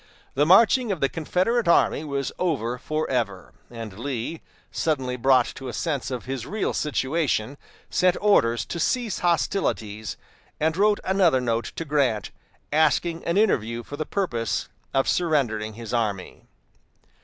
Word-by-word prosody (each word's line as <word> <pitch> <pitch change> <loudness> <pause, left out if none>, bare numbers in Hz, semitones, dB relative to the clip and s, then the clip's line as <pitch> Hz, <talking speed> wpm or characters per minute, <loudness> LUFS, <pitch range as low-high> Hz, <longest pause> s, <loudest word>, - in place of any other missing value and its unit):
The 145 +2 +2
marching 230 +5 +5
of 185 - -2
the 135 - +2
Confederate 185 - 0
army 170 -2 +3
was 140 -2 -2
over 125 -9 -1
forever, 125 -11 -2 0.2
and 115 -4 -8
Lee, 135 +4 -4 0.3
suddenly 130 -6 -1
brought 130 0 +4
to 135 - -8
a 125 - -5
sense 140 -6 -2
of 125 -2 -5
his 130 -2 -4
real 215 +1 -1
situation, 140 -4 0 0.4
sent 180 -1 +3
orders 120 - +3
to 170 - -5
cease 235 +3 0
hostilities, 110 - -1 0.4
and 160 +1 +1
wrote 205 +2 +3
another 185 -8 +3
note 115 -2 -1
to 165 - -4
Grant, 135 -8 0 0.4
asking 160 +2 +2
an 170 +3 0
interview 120 - +1
for 145 - -8
the 155 0 -4
purpose 120 - -2 0.2
of 135 0 +1
surrendering 120 -11 0
his 115 -1 -7
army. 105 -6 -2
140 Hz, 145 wpm, -24 LUFS, 120-170 Hz, 0.4 s, marching